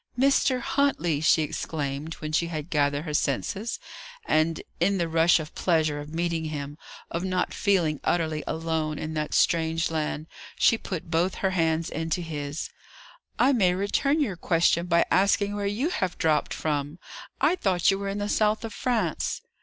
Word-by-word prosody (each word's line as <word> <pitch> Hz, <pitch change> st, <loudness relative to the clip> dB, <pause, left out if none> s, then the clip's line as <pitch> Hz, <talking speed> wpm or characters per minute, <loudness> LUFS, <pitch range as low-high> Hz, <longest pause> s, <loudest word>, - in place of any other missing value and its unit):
"Mr. 265 Hz, -1 st, +3 dB
Huntley!" 175 Hz, -, +1 dB
she 160 Hz, 0 st, +4 dB
exclaimed, 150 Hz, 0 st, -4 dB
when 155 Hz, 0 st, -6 dB
she 170 Hz, +2 st, +1 dB
had 155 Hz, 0 st, -5 dB
gathered 145 Hz, 0 st, +1 dB
her 150 Hz, -, -4 dB
senses; 145 Hz, -, -1 dB, 0.5 s
and, 155 Hz, +1 st, +1 dB, 0.2 s
in 195 Hz, +3 st, +2 dB
the 170 Hz, -2 st, 0 dB
rush 165 Hz, +1 st, +4 dB
of 155 Hz, 0 st, -7 dB
pleasure 155 Hz, -4 st, +1 dB
of 145 Hz, +1 st, -8 dB
meeting 165 Hz, 0 st, -1 dB
him, 145 Hz, -2 st, -5 dB, 0.4 s
of 170 Hz, +2 st, -2 dB
not 185 Hz, -1 st, -1 dB
feeling 175 Hz, -8 st, +1 dB
utterly 160 Hz, -3 st, 0 dB
alone 160 Hz, -2 st, -2 dB
in 155 Hz, +1 st, -4 dB
that 150 Hz, -1 st, -2 dB
strange 165 Hz, 0 st, +2 dB
land, 155 Hz, -1 st, -2 dB, 0.3 s
she -, -, +5 dB
put 175 Hz, -6 st, -6 dB
both 175 Hz, +3 st, +1 dB
her 190 Hz, -, 0 dB
hands 165 Hz, -2 st, +1 dB
into 165 Hz, +2 st, -2 dB
his. 150 Hz, -2 st, -5 dB, 0.7 s
"I 265 Hz, +3 st, +4 dB
may 185 Hz, -7 st, +3 dB
return 275 Hz, +10 st, +1 dB
your 215 Hz, -, 0 dB
question 170 Hz, 0 st, +2 dB
by 170 Hz, -1 st, +3 dB
asking 200 Hz, +1 st, +3 dB
where 205 Hz, -1 st, -1 dB
you 230 Hz, +11 st, 0 dB
have 185 Hz, -, -2 dB
dropped 155 Hz, -2 st, +1 dB
from. 145 Hz, 0 st, -2 dB, 0.4 s
I 305 Hz, +6 st, +3 dB
thought 185 Hz, -, +2 dB
you 195 Hz, -, -1 dB
were 200 Hz, 0 st, -3 dB
in 200 Hz, -, -3 dB
the 205 Hz, 0 st, -2 dB
south 215 Hz, +1 st, +1 dB
of 220 Hz, -, -6 dB
France." 220 Hz, -, -1 dB
165 Hz, 170 wpm, -26 LUFS, 155-195 Hz, 0.7 s, she